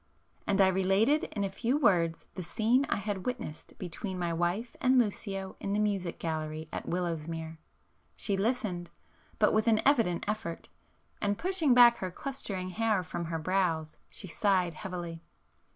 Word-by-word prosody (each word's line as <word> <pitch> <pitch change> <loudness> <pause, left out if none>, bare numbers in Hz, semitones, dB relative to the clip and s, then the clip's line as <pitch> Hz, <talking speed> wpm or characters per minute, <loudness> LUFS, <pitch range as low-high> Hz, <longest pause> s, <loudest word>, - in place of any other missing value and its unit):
And 200 -1 +2
I 190 - +7
related 195 - +3
in 200 - -3
a 195 - -1
few 235 +7 0
words 175 - +2
the 185 - -5
scene 225 - +2
I - - +2
had 200 -1 -3
witnessed 240 -11 -5
between 185 +2 -5
my 175 -1 -1
wife 175 +8 -1
and 255 0 +4
Lucio 195 -4 -1
in 200 - -2
the 205 - +1
music 195 -5 0
gallery 155 -1 -3
at - - -4
Willowsmere. 165 -2 -3 0.6
She 200 - 0
listened,—but 195 -5 -2
with 215 +1 +2
an 220 -1 +5
evident 230 -12 +3
effort,—and 205 0 -5
pushing 345 -8 +2
back 240 -1 +8
her 185 - -3
clustering 195 -4 -4
hair 215 -1 +1
from 170 +1 -4
her 165 0 -2
brows 165 -2 0
she - - -5
sighed 180 0 +1
heavily. 170 -1 -6
190 Hz, 150 wpm, -30 LUFS, 170-220 Hz, 0.6 s, back